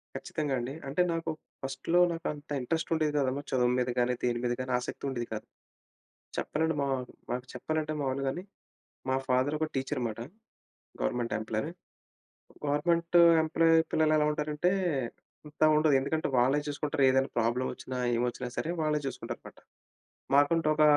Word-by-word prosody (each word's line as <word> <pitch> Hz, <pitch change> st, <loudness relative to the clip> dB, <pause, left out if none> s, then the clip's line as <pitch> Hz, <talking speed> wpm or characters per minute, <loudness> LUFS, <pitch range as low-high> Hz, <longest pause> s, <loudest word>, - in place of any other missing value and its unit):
ఖచ్చితంగా 150 Hz, -3 st, -3 dB
అండి. 120 Hz, +3 st, -4 dB
అంటే, 140 Hz, +6 st, +1 dB
నాకు 165 Hz, 0 st, -2 dB, 0.3 s
ఫస్ట్‌లో 135 Hz, +6 st, 0 dB
నాకు 165 Hz, -, -4 dB
అంత 145 Hz, +1 st, -13 dB
ఇంట్రెస్ట్ 160 Hz, +7 st, -2 dB
ఉండేది 155 Hz, -2 st, +1 dB
కాదమ్మా. 135 Hz, +1 st, 0 dB
చదువు 125 Hz, -2 st, +3 dB
మీద 125 Hz, 0 st, 0 dB
గాని, 125 Hz, +1 st, +2 dB
దేని 120 Hz, -1 st, +1 dB
మీద 120 Hz, -, +1 dB
గాని 130 Hz, 0 st, -4 dB
ఆసక్తి 125 Hz, -, -6 dB
ఉండేది 120 Hz, -3 st, -3 dB
కాదు. 110 Hz, -, -5 dB, 0.9 s
చెప్పాలంటే, 160 Hz, +1 st, 0 dB
మా -, -, 0 dB, 0.4 s
మాకు 125 Hz, +1 st, -2 dB
చెప్పాలంటే 155 Hz, -1 st, -2 dB
మాములుగానే, 135 Hz, +4 st, -1 dB, 0.7 s
మా -, -, +2 dB
ఫాదర్ 130 Hz, +4 st, +2 dB
ఒక 155 Hz, -, 0 dB
టీచర్ 135 Hz, +2 st, -1 dB
అనమాట. 115 Hz, -2 st, -3 dB, 0.8 s
Government 115 Hz, -, -1 dB
employee. 110 Hz, +7 st, -2 dB, 1.0 s
గవర్నమెంటు 170 Hz, +4 st, +2 dB, 0.2 s
ఎంప్లాయీ 165 Hz, +1 st, +4 dB
పిల్లలు 155 Hz, -1 st, +3 dB
ఎలా 150 Hz, -, +3 dB
ఉంటారంటే 150 Hz, +2 st, 0 dB, 0.8 s
అంత 150 Hz, +1 st, -2 dB
ఉండదు. 155 Hz, -2 st, +4 dB
ఎందుకంటే, 155 Hz, +4 st, -1 dB
వాళ్ళే 130 Hz, +4 st, +4 dB
చూసుకుంటారు 145 Hz, -1 st, -1 dB
ఏదైనా 135 Hz, +1 st, +2 dB
ప్రాబ్లమ్ 120 Hz, +3 st, +1 dB
వచ్చినా, 130 Hz, -, -6 dB, 0.2 s
ఏమొచ్చినా 125 Hz, +1 st, -1 dB
సరే 160 Hz, -, -1 dB
వాళ్ళే 155 Hz, -1 st, +1 dB
చూసుకుంటారనమాట. 135 Hz, -, -7 dB, 0.8 s
మాకంటూ 155 Hz, +3 st, +4 dB
ఒక 155 Hz, -, +4 dB
145 Hz, 145 wpm, -30 LUFS, 125-155 Hz, 1.0 s, ఎంప్లాయీ